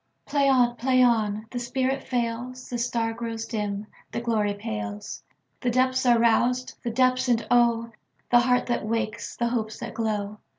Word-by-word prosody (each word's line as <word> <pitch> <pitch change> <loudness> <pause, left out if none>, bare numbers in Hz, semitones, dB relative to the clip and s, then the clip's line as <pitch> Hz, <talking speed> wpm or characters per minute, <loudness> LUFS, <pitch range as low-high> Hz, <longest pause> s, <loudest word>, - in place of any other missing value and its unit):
Play 280 -1 +2
on! 245 -2 +3
Play 255 +1 +3
on! 215 -3 +2
The 245 - -3
spirit 260 +2 -1
fails, 245 +1 -3
The 240 - -2
star 230 -1 0
grows 225 -1 -4
dim, 210 -2 -3 0.3
the - - -2
glory 215 -4 0
pales, 105 - -5 0.4
The 245 - 0
depths 255 +1 +2
are 240 -1 +6
roused—the 240 +2 +1
depths, 255 +2 +2
and 230 -2 +2
oh! 235 -1 +3 0.4
The 240 - +7
heart 250 +1 +2
that 240 -3 -1
wakes, 225 0 -3
the 235 0 +1
hopes 220 -3 -2
that - - -6
glow! 210 -2 -2
235 Hz, 165 wpm, -26 LUFS, 220-250 Hz, 0.4 s, The